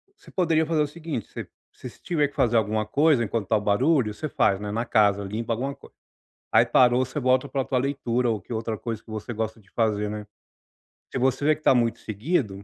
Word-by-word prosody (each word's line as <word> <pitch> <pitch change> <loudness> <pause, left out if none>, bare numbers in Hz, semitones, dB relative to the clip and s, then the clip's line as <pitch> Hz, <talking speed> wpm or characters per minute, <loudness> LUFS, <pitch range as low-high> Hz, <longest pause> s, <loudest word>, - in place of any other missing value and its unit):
você - - -18
poderia 165 -3 +2
fazer 155 -1 +1
o 150 - +1
seguinte, 155 - -6
você - - -7 0.3
você 125 - -8
se - - -19
tiver 150 -4 +1
que 145 - -18
fazer 120 -4 +2
alguma 110 0 0
coisa 140 +2 +3
enquanto 110 -1 -2
está 110 +3 +2
o 105 - -3
barulho, 115 +3 +2
você 155 +8 -5
faz, 95 -6 +2
né, 105 0 -5
na 115 +3 -2
casa, 100 -3 +3
limpa 110 +4 -3
alguma 135 +5 -3
coisa. - - -18 0.6
Aí - - +5
parou 125 0 +4
você 140 +4 -5
volta 130 +1 +2
pra 135 0 -1
tua 130 - -1
leitura 125 -2 0
ou 110 -3 -3
que 95 - -15
outra 115 -1 -2
coisa 115 -2 -5
que 110 - -13
você 110 +2 -5
gosta 110 0 -3
de 95 - -26
fazer 105 -2 0
né. 105 0 -6 0.9
Se - - -3
você 130 +2 +1
vê 155 +1 +4
que - - -18
está - - +5
muito 120 -2 +1
seguido, 110 - -2
120 Hz, 235 wpm, -25 LUFS, 110-140 Hz, 0.9 s, Aí